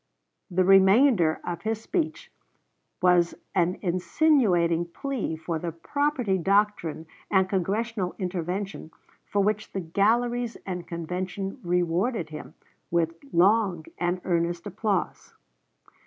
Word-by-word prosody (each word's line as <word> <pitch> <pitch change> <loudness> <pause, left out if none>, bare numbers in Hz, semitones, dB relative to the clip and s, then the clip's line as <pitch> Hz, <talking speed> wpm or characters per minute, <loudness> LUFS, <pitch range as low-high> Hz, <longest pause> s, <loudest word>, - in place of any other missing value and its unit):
The 185 +1 +2
remainder 195 - +5
of 175 -1 -4
his 220 0 -2
speech 315 +6 -3 0.7
was 175 -1 +4 0.2
an 180 0 +1
insinuating 180 - +2
plea 245 - -3
for 160 0 -4
the 170 +1 -3
property 250 - -1
doctrine 195 -4 +1 0.2
and 190 -1 +3
Congressional 195 +1 -1
intervention, 185 -1 -4 0.4
for 200 -1 +1
which 210 +1 -1
the 195 - -2
galleries 230 +7 +1
and 180 -2 -5
convention 180 +3 -4
rewarded 175 +2 0
him 150 - -9 0.3
with 165 -1 +1 0.2
long 185 -2 +3
and 175 +1 0
earnest 170 -1 0
applause. 205 -1 -2
185 Hz, 110 wpm, -26 LUFS, 170-215 Hz, 0.7 s, remainder